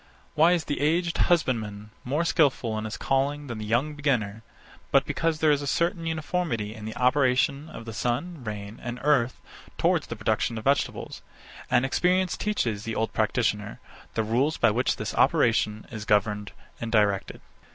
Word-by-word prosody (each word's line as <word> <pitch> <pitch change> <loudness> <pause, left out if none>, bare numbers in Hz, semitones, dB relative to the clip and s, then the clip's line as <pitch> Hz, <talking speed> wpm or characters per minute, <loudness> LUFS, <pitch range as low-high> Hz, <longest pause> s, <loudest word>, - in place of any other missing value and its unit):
Why 165 +3 +5
is 170 -4 0
the 145 - -2
aged 170 +3 +1
husbandman 110 -10 0
more 145 +7 0
skilful 130 -9 +2
in 110 0 -3
his 110 - -5
calling 140 +2 0
than 120 -5 -6
the 110 - -5
young 125 +8 +1
beginner 120 -8 -1 0.5
but - - +4
because 165 -1 0
there 155 -1 +3
is 145 -1 +2
a 145 - -4
certain 170 +5 0
uniformity 155 - -2
in 110 -1 -9
the 110 - -6
operation 135 +3 +2
of 115 - -9
the 115 - -7
sun, 125 +7 -2
rain, 105 0 -6
and 120 0 -5
earth 135 -4 +2 0.4
towards - - +2
the - - -5
production 115 - 0
of 110 - -5
vegetables; 140 +3 -1 0.5
and 125 +2 +3
experience 180 +6 +1
teaches 115 - -1
the 115 -1 -4
old 110 - -1
practitioner 110 -2 0 0.4
the 110 - +1
rules 130 +8 +1
by 120 - +4
which 125 +4 +1
this - - -4
operation 110 -2 +2
is 110 -3 -6
governed 105 0 +1 0.3
and 115 -1 -4
directed. 105 -3 +1
125 Hz, 170 wpm, -26 LUFS, 110-150 Hz, 0.5 s, Why